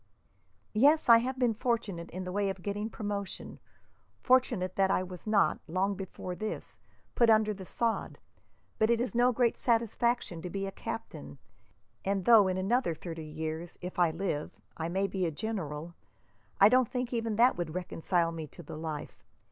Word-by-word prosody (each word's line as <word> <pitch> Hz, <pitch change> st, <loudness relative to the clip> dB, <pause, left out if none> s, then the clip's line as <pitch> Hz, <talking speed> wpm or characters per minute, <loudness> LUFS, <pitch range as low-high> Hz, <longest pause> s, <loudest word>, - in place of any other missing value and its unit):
"Yes, 285 Hz, +6 st, +4 dB
I 230 Hz, 0 st, +10 dB
have 260 Hz, +3 st, -3 dB
been 245 Hz, -3 st, +2 dB
fortunate 220 Hz, -7 st, -2 dB
in 185 Hz, +1 st, -5 dB
the 180 Hz, -, -5 dB
way 200 Hz, +1 st, 0 dB
of 190 Hz, -2 st, -6 dB
getting 205 Hz, +2 st, -2 dB
promotion; 205 Hz, -3 st, -5 dB, 0.6 s
fortunate 240 Hz, -8 st, +2 dB
that 195 Hz, -1 st, +3 dB
I 185 Hz, -, +2 dB
was 185 Hz, +1 st, -10 dB
not, 215 Hz, -2 st, +3 dB
long 185 Hz, +4 st, 0 dB
before 190 Hz, -1 st, -6 dB
this, 215 Hz, +4 st, -6 dB, 0.3 s
put 235 Hz, -2 st, +4 dB
under 215 Hz, -1 st, +4 dB
the 190 Hz, -2 st, -9 dB
sod; 230 Hz, -1 st, -1 dB, 0.6 s
but 220 Hz, -, +3 dB
it 235 Hz, -1 st, +3 dB
is 245 Hz, +1 st, -2 dB
no 245 Hz, +1 st, +4 dB
great 240 Hz, -1 st, +1 dB
gratification 235 Hz, -5 st, +1 dB
to 180 Hz, -, -5 dB
be 195 Hz, +2 st, -3 dB
a 195 Hz, -, -4 dB
captain, 75 Hz, -, -7 dB, 0.7 s
and 195 Hz, -2 st, -1 dB
though 225 Hz, -4 st, +7 dB
in 185 Hz, 0 st, 0 dB
another 195 Hz, -1 st, +1 dB
thirty 165 Hz, 0 st, -7 dB
years, 160 Hz, +2 st, -5 dB
if 180 Hz, 0 st, -6 dB
I 175 Hz, -2 st, +5 dB
live, 160 Hz, -2 st, -3 dB, 0.2 s
I 160 Hz, 0 st, -3 dB
may 190 Hz, +3 st, 0 dB
be 190 Hz, -2 st, -1 dB
a -, -, -2 dB
general, 165 Hz, -4 st, -4 dB, 0.7 s
I 200 Hz, -, +9 dB
don't 250 Hz, +1 st, +4 dB
think 250 Hz, -1 st, -3 dB
even 230 Hz, -2 st, -1 dB
that 240 Hz, +4 st, +5 dB
would 170 Hz, -2 st, -4 dB
reconcile 175 Hz, -1 st, 0 dB
me 160 Hz, -2 st, -6 dB
to 175 Hz, -, -12 dB
the 150 Hz, -, -8 dB
life. 155 Hz, -2 st, -6 dB
195 Hz, 180 wpm, -30 LUFS, 175-230 Hz, 0.7 s, I